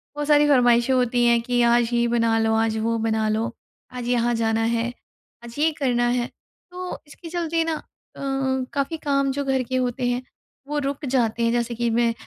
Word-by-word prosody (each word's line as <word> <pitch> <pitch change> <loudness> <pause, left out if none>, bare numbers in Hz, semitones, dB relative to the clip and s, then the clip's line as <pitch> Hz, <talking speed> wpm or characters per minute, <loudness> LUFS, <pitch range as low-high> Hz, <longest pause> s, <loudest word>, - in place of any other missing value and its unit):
बहुत 295 0 -3
सारी 295 -1 +5
फ़रमाइशें 245 -2 +4
होती 245 -1 +2
हैं 235 -1 +4
कि 245 +1 0
आज 235 0 +3
ये 235 0 +2
बना 230 -1 +2
लो, 225 0 +2
आज 225 0 +1
वो 230 +1 0
बना 220 -1 0
लो, 220 +2 -1 0.4
आज 250 -1 -6
यहाँ 240 -1 +2
जाना 225 0 +1
है, 230 0 0 0.6
आज 235 0 -10
ये 320 +2 +3
करना 240 -3 +1
है। 240 0 0 0.4
तो 360 0 -5
इसके 330 +3 -11
चलते 335 -1 -1
ना 325 0 -1
अ, - - -7 0.9
काफ़ी 285 +4 -1
काम 275 -3 0
जो 285 +1 -2
घर 265 -1 +1
के 255 +2 -4
होते 250 0 0
हैं, 245 0 -1 0.5
वो 295 +1 -2
रुक 280 +1 -3
जाते 240 -3 0
हैं। 230 - +2
जैसे 235 0 -1
कि 235 +1 0
मैं 230 0 +2
240 Hz, 200 wpm, -23 LUFS, 230-275 Hz, 0.9 s, सारी